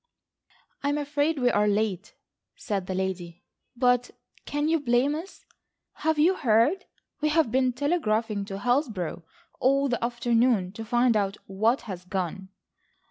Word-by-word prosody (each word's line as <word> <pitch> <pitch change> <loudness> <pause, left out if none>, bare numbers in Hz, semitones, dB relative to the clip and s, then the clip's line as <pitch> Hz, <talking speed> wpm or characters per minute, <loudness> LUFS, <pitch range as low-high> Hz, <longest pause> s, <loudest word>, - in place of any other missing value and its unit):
"I'm 285 +1 0
afraid 290 +2 0
we 250 -2 +2
are 210 0 +2
late," 205 -1 -1 0.4
said 195 -3 -3
the 185 - -3
lady, 180 -2 -4 0.3
"but 245 0 +2 0.4
can 290 +1 -1
you 325 0 +2
blame 255 +1 +2
us? 330 +6 -8 0.5
Have 315 0 -1
you 325 +5 +4
heard? 270 - +2 0.4
We 305 - +2
have 300 -6 +2
been 255 0 +2
telegraphing 230 - 0
to 195 -1 -6
Hillsborough 220 - -1 0.4
all 275 +2 +2
the 240 -2 -1
afternoon 235 -4 +1
to 225 +3 -7
find 240 +1 +2
out 200 -1 0
what 220 +6 +1
has 185 -5 -7
gone." 190 0 -4
240 Hz, 140 wpm, -26 LUFS, 200-285 Hz, 0.5 s, you